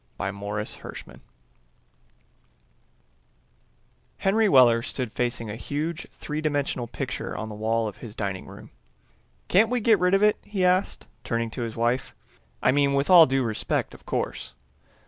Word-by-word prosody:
By 95 - -2
Morris 105 +1 -5
Hershman - - -10 3.0
Henry 210 +2 +2
Weller 120 -6 +6
stood 125 -2 -4
facing 120 -2 -2
a - - -5
huge 155 +7 -4
three 150 0 -5
dimensional 145 -5 -1
picture - - -5
on 110 - -5
the - - -7
wall 110 +1 0
of 105 - -7
his 115 -3 -10
dining 100 -3 -4
room. - - -12 0.8
"Can't 215 +5 +4
we 250 0 0
get 220 -2 +4
rid 180 +1 +3
of 195 - +2
it?" 210 0 +4
he 200 -3 -1
asked, 180 +2 +1 0.2
turning 115 -1 -2
to 125 - -5
his 115 -2 -4
wife. 120 +2 -1 0.5
"I - - +5
mean, 140 0 +2
with 140 +6 +1
all 170 -3 +9
due 135 0 +1
respect, 110 -3 -2
of - - -16
course." 65 - -3
130 Hz, 155 wpm, -25 LUFS, 115-175 Hz, 3.0 s, all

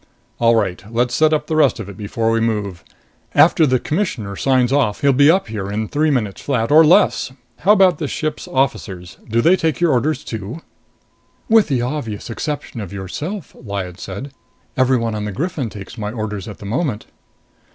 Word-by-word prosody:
"All 115 0 +4
right. 95 -5 -1
Let's 120 +1 0
set 155 +3 +3
up 155 - +1
the 160 - -2
rest 145 -5 +3
of 110 - -6
it 100 - -9
before 110 +3 -1
we 115 - +2
move. 105 -6 -2 0.5
After 160 - +5
the 130 -1 +3
Commissioner 125 - -2
signs 130 +2 +2
off, 125 -8 +1
he'll 140 -1 +4
be 140 +3 +5
up 190 +4 +3
here 105 -3 -4
in 105 +2 -2
three 150 +5 +1
minutes 110 -9 -1
flat. 125 -4 -1
Or 155 +2 +8
less. 155 -4 +4 0.3
How 200 +6 +5
about 185 -6 +4
this 150 - -2
ship's 155 -1 -3
officers 95 -9 -2
do 115 +2 +2
they 170 +8 +5
take 160 -4 -1
your 170 -2 +3
orders 145 +5 0
too?" 110 +7 -6 0.9
"With 225 -2 +5
the 125 -4 0
obvious 120 -5 -4
exception 145 -2 -4
of 100 - -7
yourself," 145 - -6
Lyad 100 -5 -6
said, 100 +9 -7 0.4
"everyone 125 -3 +2
on 105 -1 -3
the 105 - -3
Griffin 140 - -3
takes 100 +3 -10
my 105 0 -3
orders 105 -4 -5
at 105 - -8
the - - -11
moment." 115 - -2
120 Hz, 190 wpm, -19 LUFS, 105-150 Hz, 0.9 s, Or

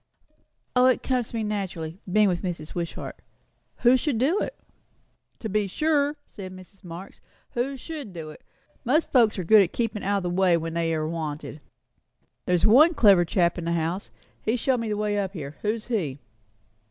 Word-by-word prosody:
"O, 250 0 +6
it 255 - +2
comes 250 -3 0
to - - -8
me 225 - -1
naturally, 190 -5 -4
being 210 +1 +5
with 175 -2 0
Mrs. 170 -5 -5
Wishart. 170 -1 -5 0.6
Who 245 +1 +7
should 260 -1 -1
do 295 - +2
it?" - - -3 0.8
"To 220 - -5
be 210 -1 0
sure," 295 +5 +1
said 190 -2 -9
Mrs. 185 +2 -14
Marx; 175 +2 -10 0.3
"who 265 +3 -2
should 290 -6 -7
do 160 -3 -7
it? - - -14 0.4
Most 300 +7 +1
folks 230 -6 +4
are 185 - -2
good 210 +5 +7
at 180 - 0
keepin' 225 -3 -2
out 200 +1 +1
o' - - -1
the 180 - -2
way 180 -1 +3
when 165 0 -4
they 165 -1 0
are 155 0 -1
wanted. 155 -2 -5 0.9
There's 180 -1 +2
one 300 +10 +6
clever 195 -8 +6
chap 170 0 +1
in 170 - -5
the 170 - 0
house 170 +4 -2 0.3
he 220 - 0
showed 250 +1 +1
me 230 -1 -3
the 210 - -1
way 210 -1 0
up 195 -1 -2
here; 150 -5 -7
who's 215 +1 -1
he?" 175 - -2
200 Hz, 190 wpm, -25 LUFS, 170-235 Hz, 0.9 s, Who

